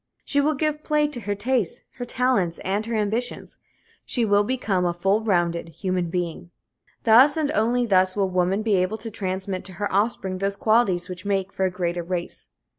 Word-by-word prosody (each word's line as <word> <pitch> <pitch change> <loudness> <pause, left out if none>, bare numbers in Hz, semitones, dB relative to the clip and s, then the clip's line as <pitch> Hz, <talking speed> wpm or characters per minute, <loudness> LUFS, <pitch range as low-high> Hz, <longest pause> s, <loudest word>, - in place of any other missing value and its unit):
She 285 - +2
will 305 +2 +1
give 305 +1 -1
play 300 -1 +2
to 290 -5 -6
her 205 -2 -3
tastes, 225 -2 -1
her 245 - -4
talents 245 -9 +1
and 200 +3 0
her 230 - -2
ambitions. 220 +4 -2 0.4
She 240 -3 0
will 205 -1 +4
become 205 -6 0
a 175 -1 0
full 195 +5 +1
rounded 175 -5 0
human 180 0 -2
being. 175 -1 -3 0.5
Thus 255 +6 +6
and 300 -2 0
only 245 -2 +1
thus 185 -3 +3
will 200 -2 +1
woman 185 +3 +1
be 215 -2 +1
able 185 +4 0
to 225 0 -7
transmit 190 -2 -3
to 190 - -6
her 200 +3 -3
offspring 195 -2 0
those 195 +1 -1
qualities 210 -4 +2
which 180 0 -8
make 195 -1 -1
for 190 - 0
a - - +2
greater 175 -1 -2
race. 175 0 -5
200 Hz, 190 wpm, -24 LUFS, 185-235 Hz, 0.5 s, Thus